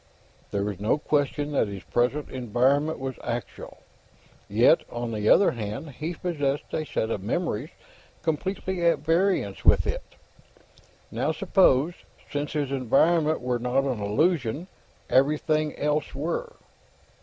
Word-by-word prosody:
There 100 0 -1
was 100 -2 -3
no 105 +7 +2
question 145 -1 0
that 140 - +1
his 100 -3 -7
present 125 +8 0
environment 130 +5 +1
was 130 -1 -5
actual. 120 0 -6 0.7
Yet, - - +5
on 120 -1 -4
the 105 -1 0
other 200 - +6
hand, 115 +6 -5
he 155 +6 -5
possessed 145 -5 -2
a 155 - -1
set 110 - -1
of 100 - -2
memories 130 - -2 0.5
completely 180 +3 -2
at 170 0 +4
variance 175 +5 0
with - - +5
it. - - -4 1.0
Now, - - 0
suppose, 165 -4 +3 0.4
since 145 0 -3
his 145 -3 -1
environment 155 +5 +2
were 125 -1 -1
not 125 +3 +1
an 130 -5 -2
illusion, 145 - 0 0.4
everything 150 +2 +2
else 150 -1 -1
were? 170 - -3
145 Hz, 130 wpm, -26 LUFS, 120-160 Hz, 1.0 s, other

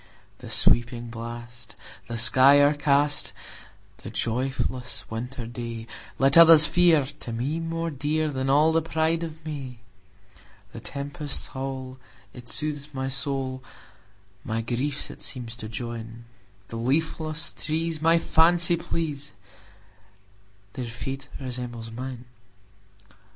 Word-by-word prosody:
"The - - -10
sweeping 120 0 +2
blast, 120 0 -8 0.3
the 115 0 -4
sky 130 +5 +7
o'ercast,"The 145 0 -1
joyless 125 +1 -2
winter 120 +2 -5
dayLet 120 +4 0
others 165 -2 +10
fear, 170 -4 +4
to 120 - -7
me 130 +8 -2
more 165 0 -3
dearThan 145 -1 -1
all 150 +4 +5
the 165 0 +2
pride 160 +1 0
of 160 -1 -7
May:The 115 -10 -11
tempest's 145 +1 -4
howl, 130 -1 -6 0.3
it 125 -1 -11
soothes 150 -1 -4
my 130 0 -2
soul, 130 -1 -2 0.8
My 110 +1 -2
griefs 130 +5 -2
it - - -13
seems 120 -3 -4
to 110 -2 -7
join; 115 0 -7 0.4
The 115 - -6
leafless 155 +5 -1
trees 160 0 -2
my 165 +1 +5
fancy 170 +1 +3
please, 150 -7 -4 1.4
Their 125 -3 -5
fate 125 +4 -6
resembles 120 -3 -5
mine! 125 +1 -7
135 Hz, 110 wpm, -25 LUFS, 120-155 Hz, 1.4 s, others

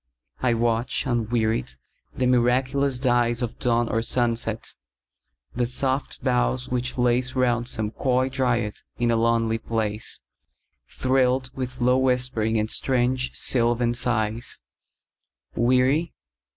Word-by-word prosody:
I 120 -2 +1
watch, 115 +3 0
unwearied, 115 - 0 0.4
the 130 - 0
miraculous 130 +2 +2
dyesOf 120 -2 0
dawn 120 -1 +1
or 115 - 0
sunset; 115 -2 -1 0.8
the 120 0 0
soft 130 +2 -1
boughs - - +1
which 125 +1 -1
laceRound 125 -1 +1
some 110 -3 -3
coy 130 +1 +1
dryad 125 -5 -1 0.2
in 120 0 +1
a - - +2
lonely 115 0 +1
place, 110 -1 -2 0.7
Thrilled 130 0 +1
with 130 0 -5
low 125 +1 +3
whispering 125 -4 0
and 105 0 0
strange 125 0 0
sylvan 120 -1 +2
sighs:Weary? 120 +4 -2
120 Hz, 105 wpm, -24 LUFS, 115-130 Hz, 0.8 s, low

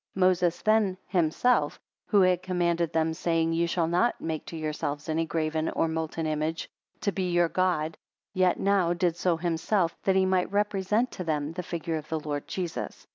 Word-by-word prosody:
9 185 -1 +5
Moses 175 -2 0
then 215 -3 +3
himself, 175 0 +1 0.3
who 205 -3 +4
had 185 -1 +3
commanded 175 -3 0
them, 160 0 +1
saying, 165 -1 0
Ye 170 +1 +1
shall 170 0 +1
not 175 +9 +1
make 160 -2 -3
to 165 - -6
yourselves 150 -2 -3
any 160 +1 0
graven 155 0 -1
or - - 0
molten 160 0 -3
image, 155 +1 -2 0.3
to 200 - +1
be 185 -1 -2
your 175 -1 +3
God 165 -4 0 0.4
yet 185 -2 +2
now 190 -3 +2
did 175 -1 0
so 175 -1 +1
himself, 170 +2 0
that 190 - +2
he 190 0 +4
might 185 -1 +1
represent 205 +3 +1
to 180 - -5
them 150 -2 -1
the 180 - -4
figure 165 -2 -3
of 155 0 -8
the 160 - -1
Lord 145 -1 -4
Jesus. 180 -3 -5
170 Hz, 185 wpm, -27 LUFS, 160-185 Hz, 0.4 s, 9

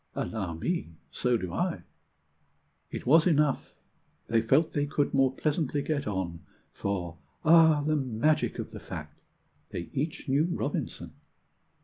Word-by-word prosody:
"Allow 95 -7 -3
me, 85 - -3 0.2
so 125 -1 +1
do 90 -5 -5
I." - - -1 1.1
It - - -6
was 160 +6 +6
enough: 150 -4 +1 0.5
they 115 0 +2
felt 135 +8 +3
they 145 0 0
could 145 0 0
more 135 -1 +4
pleasantly 145 0 -1
get 145 -3 -1
on, 95 -4 -2 0.3
For 90 -4 -3 0.3
(ah, 160 -2 +6
the 155 0 +2
magic 135 +4 +1
of - - -5
the - - -8
fact!) - - -8 0.5
they 85 - -6
each 150 +3 -3
knew 140 +4 +3
Robinson! 175 - -3
140 Hz, 135 wpm, -29 LUFS, 110-155 Hz, 1.1 s, was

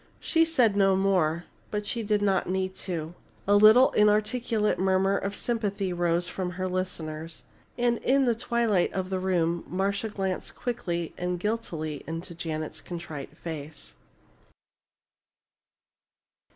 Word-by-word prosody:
She 330 -1 +3
said 250 -10 +3
no 195 -1 +4
more, 180 -4 +2 0.3
but 210 0 -3
she 230 - -2
did 210 -1 +1
not 190 -3 +1
need 190 0 -1 0.2
to. 165 -2 -3 0.3
A 205 - +5
little 215 +5 +7
inarticulate 210 +1 +2
murmur 190 +1 +2
of 200 0 -2
sympathy 200 -5 -1
rose 175 0 +1
from 180 -2 -4
her 185 +1 -2
listeners. 165 -3 -4 0.3
And 240 -1 +1
in 270 +1 +3
the 240 - +3
twilight 230 -4 +1
of 190 0 -3
the 190 - 0
room 170 -2 0
Marcia 200 +4 -1
glanced 190 -3 -3
quickly 175 -9 -3
and 180 0 -2
guiltily 170 -8 -3
into 165 +2 -5
Janet's 155 -2 -4
contrite 165 -5 -7
face. 155 -2 -7
190 Hz, 130 wpm, -27 LUFS, 170-210 Hz, 0.3 s, little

